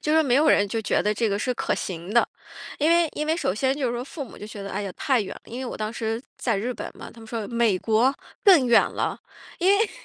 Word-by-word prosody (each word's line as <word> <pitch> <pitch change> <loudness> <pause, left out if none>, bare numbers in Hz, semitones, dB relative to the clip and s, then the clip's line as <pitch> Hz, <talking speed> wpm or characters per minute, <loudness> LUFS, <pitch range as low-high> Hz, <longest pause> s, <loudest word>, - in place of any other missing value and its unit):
就 305 +1 +1
说 320 - +5
没 260 -5 +2
有 305 +2 +4
人 205 - +4
就 225 +3 -2
觉 215 - +1
得 210 - +1
这 220 +1 0
个 200 - 0
是 250 - 0
可 - - -1
行 175 +1 -5
的。 235 - +5 0.5
因 305 +2 +3
为 340 0 +5
因 300 - -2
为 320 +1 +1
首 185 - -1
先 265 +5 +1
就 280 -3 -1
是 235 - -1
说 240 - -3
父 280 +2 -7
母 - - -13
就 210 - -8
觉 210 -1 -8
得， 200 - -6
哎 205 - -3
呀， 200 - -4
太 265 -5 +2
远 200 - -5
了， - - -13
因 240 +3 -7
为 260 - -4
我 - - -5
当 215 +1 -3
时 225 -1 -2 0.2
在 230 -5 0
日 230 +6 -2
本 - - -6
嘛， - - -9
他 230 - -15
们 225 - -12
说： 220 -2 -4
“美 230 -4 +3
国， 230 +6 +2 0.3
更 355 - +7
远 235 -1 +6
了。” - - -2 0.4
因 365 0 +2
为 430 +1 +1
235 Hz, 310 characters per minute, -25 LUFS, 215-280 Hz, 0.5 s, 更